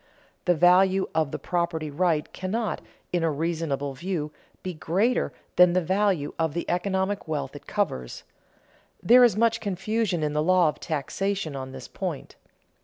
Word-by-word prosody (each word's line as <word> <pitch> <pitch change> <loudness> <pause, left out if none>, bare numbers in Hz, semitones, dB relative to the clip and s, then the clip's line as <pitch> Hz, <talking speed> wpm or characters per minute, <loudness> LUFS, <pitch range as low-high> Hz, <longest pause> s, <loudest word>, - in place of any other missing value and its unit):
The 180 - +4
value 185 +3 +4
of 160 -2 +1
the - - -4
property 170 -3 -2
right 160 0 0
cannot, 210 +4 -2 0.3
in 175 -2 +1
a 165 - +2
reasonable 150 -3 -2
view, 160 0 -3 0.3
be 185 - -3
greater 195 +10 0 0.3
than 180 -1 +7
the 185 - +3
value 185 -4 0
of 160 -2 0
the 170 - -3
economic 190 +2 -1
wealth 145 -3 -3
it 145 - -11
covers. 65 - -2 0.8
There 245 +7 +7
is 230 -5 +4
much 230 0 +3
confusion 200 -2 -1
in 150 -1 -1
the 150 - +1
law 180 0 +4
of 150 - -6
taxation 165 +2 -2
on 130 -1 -6
this 130 -3 -9
point. - - -5
175 Hz, 160 wpm, -26 LUFS, 150-195 Hz, 0.8 s, than